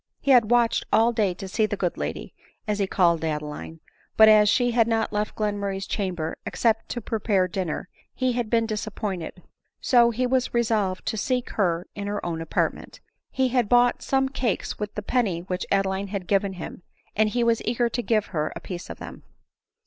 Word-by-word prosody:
He 280 - +1
had 240 -5 +6
watched 240 -1 +3
all 230 +2 +4
day 205 -6 +1
to 195 - -7
see 215 +3 +1
the 205 - -3
good 180 -3 -1
lady, 75 -4 -5 0.3
as 210 -1 -1
he 200 - +1
called 170 -4 +2
Adeline; 150 +1 -4 0.4
but 220 - +9
as 210 -1 +6
she 245 +2 +2
had 230 -1 +3
not 225 -1 0
left 210 0 -2
Glenmurray's 200 -2 -2
chamber 175 -6 -3
except 225 -1 0
to 240 - -4
prepare 205 -4 0
dinner, 180 -3 -3 0.3
he 255 -1 +1
had 240 -2 -2
been 230 0 +2
disappointed; 210 -5 -4 0.4
so 240 -2 +4
he 240 +2 -1
was 255 -1 0
resolved 215 -5 0
to 220 - -2
seek 250 +3 -1
her 175 -4 0
in 200 0 -5
her 205 0 -3
own 165 -2 -3
apartment. 165 - -2 0.3
He 260 -1 +1
had 245 -4 +1
bought 245 0 +4
some 270 0 +1
cakes 255 -5 -2
with 210 0 -4
the 210 - -4
penny 205 -8 0
which 180 +1 -4
Adeline 195 0 0
had 195 -2 -4
given 195 0 +1
him, 180 0 -8 0.3
and 215 +1 +3
he 240 +2 0
was 230 -1 +2
eager 235 +1 +1
to 245 - -2
give 220 -3 +1
her 155 -1 -1
« - - -11
piece 180 -2 -7
of - - -7
them. - - -9
210 Hz, 195 wpm, -25 LUFS, 185-235 Hz, 0.4 s, but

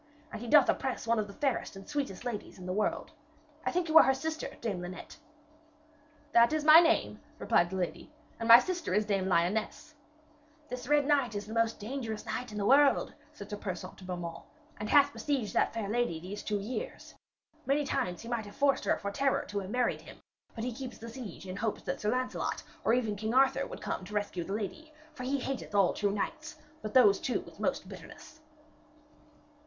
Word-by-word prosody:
And 220 - -6
he 240 - -6
doth 290 0 +6
oppress 265 -3 -1
one 230 0 +2
of 210 - -1
the 200 - -10
fairest 275 -6 -1
and 195 - -11
sweetest 280 -8 -3
ladies 230 -4 -5
in 185 - -10
the 185 - -2
world. 210 +2 -1 0.5
I - - 0
think 355 -1 0
you 320 0 +8
are - - +9
her 265 - +3
sister, 315 +3 -3
Dame 205 -6 -3
Linet?' 180 +1 -8 1.1
'That 235 0 +6
is 310 -1 0
my 310 +2 +10
name,' 335 -1 +2 0.2
replied 175 - +2
the 190 - -5
lady, 185 - -4 0.3
'and 230 - -3
my 230 - +13
sister 345 - -1
is 210 0 +2
Dame 195 -2 0
Lyones.' 190 - 0 0.8
'This 250 0 -6
Red 295 0 +3
Knight 275 -6 +2
is 205 - -3
the 220 - -8
most 230 0 +1
dangerous 220 -1 -5
knight 250 -2 -4
in 210 - -6
the 200 - -1
world,' 275 +3 +4 0.2
said 210 -8 -11
Sir 205 - -3
Persaunt 185 -2 -6
to - - -12
Beaumains, 175 -2 -5 0.4
'and 210 - -4
hath 285 0 +5
besieged 275 -8 -2
that - - +2
fair 225 -3 -3
lady 225 -6 0
these 190 +5 -7
two 210 - -1
years. 250 - -6 0.5
Many 285 +2 +2
times 180 -9 -2
he - - -9
might 235 -3 -3
have 205 - -12
forced 280 -1 +2
her - - +2
for 200 - -4
terror 270 +5 +1
to 205 - -2
have 190 -1 -6
married 245 +2 0
him, - - -13 0.4
but 225 - -4
he 250 0 -2
keeps 255 +1 -7
the 230 - -9
siege 230 -7 -8
in 185 +1 -6
hopes 220 0 -2
that - - -4
Sir 210 - 0
Lancelot 255 +2 -2 0.2
or 230 - +3
even 225 -4 0
King 220 +4 -3
Arthur 265 0 +4
would - - -9
come - - -3
to 210 +3 -8
rescue 205 -4 -2
the 195 - -5
lady. 225 +10 -5 0.2
For 265 - -9
he 270 +2 -1
hateth 265 -5 -4
all 195 -3 +4
true 205 - 0
knights, 310 +10 -4 0.3
but 215 +2 -6
those 205 -6 +6
two 250 - -1
with - - -15
most - - -1
bitterness.' 310 - -12
230 Hz, 210 wpm, -31 LUFS, 205-275 Hz, 1.1 s, my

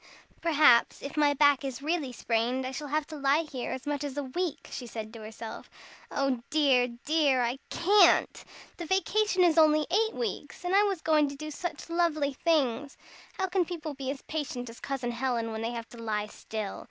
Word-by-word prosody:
"Perhaps, 300 -8 +4
if 280 - -6
my 295 -1 +3
back 285 -1 +4
is 270 0 -5
really 310 -4 -1
sprained, 245 +2 -1
I 260 - -3
shall 295 +2 -5
have 305 +1 0
to 315 - -9
lie 280 +3 +2
here 265 -6 -5
as 260 - -5
much 290 0 -2
as 285 -1 -5
a 290 - -1
week," 330 +5 -3
she 245 - -6
said 220 -1 -7
to 230 - -9
herself. 220 +1 -8 0.4
"Oh 270 -3 0
dear, 275 -5 +3 0.2
dear! 290 -5 +3
I 240 +3 -2
can't. 400 +4 +4 0.3
The 340 - -6
vacation 380 +1 +2
is 335 -2 +4
only 305 -1 +5
eight 440 +3 +2
weeks, 455 -5 -5
and 360 +2 +1
I 400 - +7
was 395 -5 0
going 305 -2 +3
to 280 - -7
do 305 +2 -7
such 350 +4 -5
lovely 330 -4 +1
things! 280 -3 0 0.4
How 380 - -1
can 375 0 +1
people 325 -3 -5
be 270 -1 -5
as 275 0 -5
patient 255 -6 -4
as 230 - -14
Cousin 265 -3 -3
Helen 235 -2 -1
when 220 0 -4
they 230 +1 -2
have 230 0 -6
to 235 - -12
lie 210 -2 -1
still? 210 -1 -6
285 Hz, 200 wpm, -29 LUFS, 245-320 Hz, 0.4 s, I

